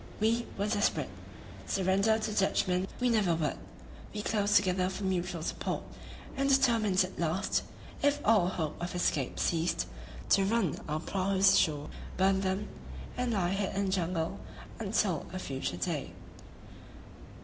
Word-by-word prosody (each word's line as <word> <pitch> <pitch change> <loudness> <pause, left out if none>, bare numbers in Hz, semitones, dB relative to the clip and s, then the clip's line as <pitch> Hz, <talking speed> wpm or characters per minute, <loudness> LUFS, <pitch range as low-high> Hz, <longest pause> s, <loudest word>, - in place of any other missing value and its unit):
We 230 +2 +1
were 200 - 0
desperate; 205 -1 0 0.6
surrender 195 +3 +2
to 220 -1 -3
Dutchmen 190 -2 +1
we 250 - +2
never 205 -7 +3
would; 155 -3 -1 0.6
we 210 - -3
closed 205 -2 +1
together 185 -2 +3
for 195 +1 -5
mutual 180 -3 -1
support, - - -3 0.5
and 275 +1 +1
determined 230 -8 +4
at 185 - -7
last, 170 +3 +1 0.4
if 285 0 +3
all 210 -5 +5
hope 160 -4 -3
of 175 +1 -4
escape 145 -6 0
ceased, 165 0 +1 0.4
to 195 - +5
run 195 -5 +1
our 155 +1 0
prahus 195 +1 +3
ashore, 150 -3 +2 0.3
burn 190 +1 +3
them, 190 +2 -1 0.5
and 250 -1 -1
lie 180 -4 +1
hid 195 0 -1
in 200 0 +1
the 190 - -1
jungle 175 -1 -1 0.4
until 195 -5 0
a - - -3
future 135 - -3
day. 90 - -2
190 Hz, 145 wpm, -31 LUFS, 175-210 Hz, 0.6 s, all